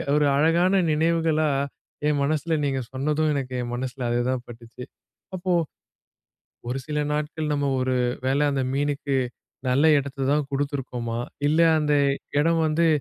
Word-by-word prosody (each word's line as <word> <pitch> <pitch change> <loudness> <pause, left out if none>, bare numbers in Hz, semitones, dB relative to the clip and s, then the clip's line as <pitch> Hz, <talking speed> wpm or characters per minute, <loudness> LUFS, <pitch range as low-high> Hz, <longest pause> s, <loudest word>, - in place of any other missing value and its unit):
ஒரு 150 0 +3
அழகான 170 +6 +3
நினைவுகளா 160 0 +2 0.6
என் 150 -1 +1
மனசுல 155 +2 0
நீங்க 135 -1 0
சொன்னதும், 150 +4 0
எனக்கு 135 -3 -3
என் 120 0 -4
மனசுல 130 0 -4
அது 120 0 +1
தான் 130 -1 -1
பட்டுச்சு. 120 +1 -11 0.5
அப்போ 185 0 -2 1.2
ஒரு 125 +2 -2
சில 150 -1 -2
நாட்கள், 150 +1 -2
"நம்ப 145 -1 0
ஒரு 130 0 0 0.3
வேளை 140 +3 +2
அந்த 135 -1 0
மீனுக்கு 140 0 -1 0.5
நல்ல 135 +5 +3
இடத்த 135 -1 -4
தான் 150 -1 +1
குடுத்துருக்கோமா? 130 -4 -3 0.3
இல்ல 155 +2 +2 0.2
அந்த 150 -1 +1 0.5
இடம் 165 +2 +3
வந்து 165 +2 +2
145 Hz, 140 wpm, -24 LUFS, 130-155 Hz, 1.2 s, ஒரு